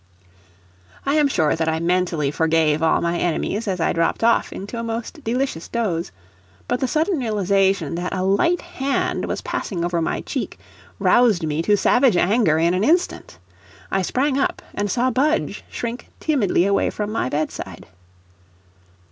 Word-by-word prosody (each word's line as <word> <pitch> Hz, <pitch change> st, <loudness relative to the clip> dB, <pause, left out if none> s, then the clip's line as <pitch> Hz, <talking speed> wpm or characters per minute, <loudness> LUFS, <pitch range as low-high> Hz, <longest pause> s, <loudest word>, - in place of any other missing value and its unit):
I 275 Hz, -, +1 dB
am 300 Hz, -1 st, +4 dB
sure 160 Hz, -, +1 dB
that 160 Hz, 0 st, 0 dB
I 160 Hz, 0 st, 0 dB
mentally 170 Hz, -4 st, 0 dB
forgave 160 Hz, -1 st, +2 dB
all 160 Hz, -, +3 dB
my 170 Hz, 0 st, 0 dB
enemies 200 Hz, +5 st, -1 dB
as 185 Hz, -2 st, -1 dB
I 165 Hz, -, +1 dB
dropped 165 Hz, +6 st, 0 dB
off 235 Hz, 0 st, +3 dB
into 205 Hz, +5 st, -6 dB
a -, -, -3 dB
most 230 Hz, +7 st, -5 dB
delicious 240 Hz, -7 st, -2 dB
doze, 185 Hz, -, -2 dB, 0.6 s
but -, -, 0 dB
the 260 Hz, -, 0 dB
sudden 320 Hz, +4 st, +1 dB
realization 195 Hz, -, +1 dB
that 175 Hz, +2 st, -3 dB
a 185 Hz, -1 st, -2 dB
light 200 Hz, -, +2 dB
hand 270 Hz, +1 st, -2 dB
was -, -, -3 dB
passing 175 Hz, -4 st, -3 dB
over 175 Hz, -1 st, 0 dB
my -, -, -1 dB
cheek -, -, -4 dB, 0.4 s
roused 220 Hz, -9 st, +3 dB
me 155 Hz, +1 st, -1 dB
to 205 Hz, +4 st, +3 dB
savage 245 Hz, -2 st, +3 dB
anger 195 Hz, -4 st, +3 dB
in 170 Hz, +2 st, +2 dB
an 185 Hz, +2 st, +1 dB
instant. 330 Hz, -, 0 dB, 0.5 s
I 195 Hz, -, +1 dB
sprang 270 Hz, +8 st, 0 dB
up, -, -, -1 dB
and 205 Hz, 0 st, -2 dB
saw 250 Hz, +5 st, +1 dB
Budge 295 Hz, +6 st, 0 dB
shrink 235 Hz, 0 st, -5 dB
timidly 225 Hz, -, +2 dB
away 200 Hz, 0 st, +2 dB
from 210 Hz, 0 st, -4 dB
my 215 Hz, -, -1 dB
bedside. 155 Hz, +3 st, -4 dB
200 Hz, 165 wpm, -21 LUFS, 170-245 Hz, 0.6 s, am